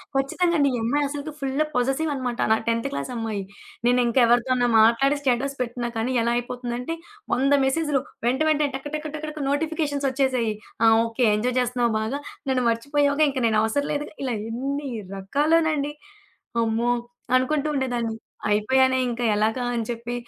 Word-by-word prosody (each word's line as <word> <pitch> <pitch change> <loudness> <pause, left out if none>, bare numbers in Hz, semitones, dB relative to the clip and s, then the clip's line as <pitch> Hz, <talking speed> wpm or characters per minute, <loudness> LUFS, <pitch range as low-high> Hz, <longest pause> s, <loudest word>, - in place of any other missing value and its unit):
ఖచ్చితంగండి. 285 +2 +2
ఈ - - -1
అమ్మాయి 285 +6 +1
అసలకి 290 +2 -5
ఫుల్లు 275 +2 0
పొససివనమాట. 265 -1 -1
నా - - +7
10థ్ 230 +3 +1
క్లాసమ్మాయి. 225 -7 -3 0.4
నేనింక 245 0 +2
ఎవరితోన్నా 245 +1 +3
మాట్లాడి 235 +6 +4
స్టేటస్ 275 +1 0
పెట్టినా 240 0 -2
కానీ, 235 +3 -1
ఎలా 235 +1 +1
అయిపోతుందంటే, 245 +4 -4 0.4
వంద 275 +3 +2
మెసేజులు. 290 0 +1 0.3
వెంట, 260 +4 +1
వెంటనే 300 -1 +2
టక, 270 +2 -6
టక, 305 - -4
టక, 310 - -7
టక 305 -1 -5
నోటిఫికేషన్సోచ్చేసేయి. 280 -6 0 0.3
ఆ! - - +6 0.2
ఓకే 230 +2 0
ఎంజాయ్ 245 +4 -1
జేస్తున్నావు 245 -2 +1
బాగా, 240 +6 -2 0.3
నన్ను 255 -1 +1
మర్చిపోయావుగా, 285 +5 +2
ఇంక 270 - -3
నేను 220 -1 +2
అవసరం 285 +6 0
లేదుగా, 295 +1 -4
ఇలా 250 -4 -1 0.2
ఎన్ని, 275 +4 -3 0.3
రకాలోనండి. 295 +7 +1 0.7
అమ్మో! 230 +2 +1 0.4
అనుకుంటూ 285 +3 +1
ఉండేదాన్ని. 240 -4 -1 0.3
అయిపోయానే 260 +5 +3
ఇంకా 240 0 -3
ఎలాగా 220 +4 +1
అని 235 - -1
చెప్పి 235 0 -4
260 Hz, 140 wpm, -24 LUFS, 235-285 Hz, 0.7 s, నా